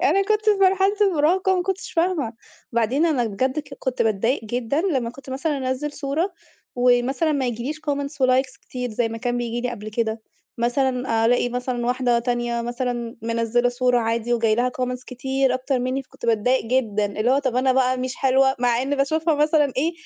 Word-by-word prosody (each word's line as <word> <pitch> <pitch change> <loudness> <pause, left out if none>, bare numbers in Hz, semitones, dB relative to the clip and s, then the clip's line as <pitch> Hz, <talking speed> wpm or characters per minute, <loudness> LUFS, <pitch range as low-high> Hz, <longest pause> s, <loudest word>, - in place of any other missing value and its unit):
أنا 375 +8 +4
كنت 425 +1 0
في 425 -2 +4
مرحلة 385 +1 +4
المراهقة، 375 0 +3
وما 365 - +1
كنتش 385 +1 -4
فاهمة. 330 -9 0 0.4
بعدين 240 +8 +2
أنا 275 -7 +1
بجد 255 +6 -1
ك 285 -2 -6
كنت 260 -1 -1
باتضايق 225 +4 0
جدًا 245 +6 -1
لمّا 270 -11 0
كنت 265 +1 -12
مثلًا 285 +3 -1
أنزل 260 +3 -2
صورة، 300 +7 -2 0.4
ومثلًا 250 +6 +2
ما 280 -3 0
ييجيليش 245 +6 -4
comments 280 0 -2
وlikes 255 +1 +1
كتير 250 -1 -5
زي 225 +1 0
ما 225 0 -6
كان 245 +1 -1
بييجي 240 0 -2
لي 245 0 -2
قبل 215 -3 -7
كده. 220 0 -2 0.4
مثلًا 245 -1 +1
ألاقي 245 +1 +2
مثلًا 245 0 -3
واحدة 245 -1 +2
تانية 240 0 -1
مثلًا، 240 -1 -3
منزلة 230 +1 +1
صورة 245 0 +2
عادي 230 +1 0
وجاي 225 -2 +2
لها 245 +2 +1
comments 250 0 -2
كتير 265 +1 0
أكتر 255 +1 -1
مني، 255 +2 -1
فكنت 255 - -10
باتضايق 230 +3 +2
جدًا. 220 -5 +1
اللي 215 +4 -1
هو 270 - +4
طب، 260 -3 -1
أنا 260 0 +3
بقى 255 0 +2
مش 255 0 -3
حلوة 265 0 +3
مع 240 0 +2
ان 280 +2 -1
باشوفها 315 +3 +1
مثلًا 300 -1 +2
إيه، 315 +6 +1
255 Hz, 190 wpm, -23 LUFS, 240-280 Hz, 0.4 s, أنا